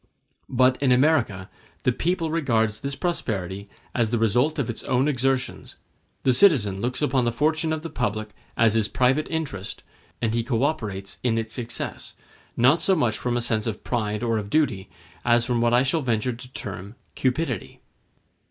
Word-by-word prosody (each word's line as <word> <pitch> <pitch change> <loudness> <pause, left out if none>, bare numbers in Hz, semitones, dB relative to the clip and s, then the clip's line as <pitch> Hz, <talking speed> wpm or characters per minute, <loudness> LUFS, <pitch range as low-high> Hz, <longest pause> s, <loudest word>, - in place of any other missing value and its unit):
But 130 +1 +3
in 135 -2 +3
America 125 -9 +2 0.4
the 125 - +3
people 165 +4 -1
regards 115 -9 +1
this 140 +3 -3
prosperity 100 - -3 0.2
as 115 -3 +1
the 120 - 0
result 120 +8 +2
of 140 -6 -1
its 120 - -4
own 130 +2 +2
exertions; 130 -2 -1 0.5
the 130 - +4
citizen 120 - +4
looks 125 +5 -1
upon 130 -3 +2
the 120 - +1
fortune 155 +6 +1
of 155 0 -2
the 165 - -5
public 110 -3 -2 0.3
as 115 -2 +4
his 110 -2 +2
private 130 +6 +2
interest, 140 - -4 0.4
and 115 -2 0
he 115 0 +1
co 120 0 0
operates 105 -10 -2
in 115 -2 +1
its 115 0 -2
success, 120 -2 -4 0.4
not 130 +7 +4
so 190 - +3
much 120 -9 0
from 120 -1 -1
a - - 0
sense 110 -1 -1
of 110 -2 -4
pride 105 -2 -2
or 115 -2 +1
of 100 -1 -6
duty, 120 -9 +1 0.3
as 120 0 +3
from 120 -1 0
what 120 0 +3
I 120 +1 +4
shall 145 +4 +1
venture 120 -1 0
to 125 +2 -11
term 100 +2 -7 0.2
cupidity. 135 +6 -2
120 Hz, 180 wpm, -24 LUFS, 110-140 Hz, 0.5 s, the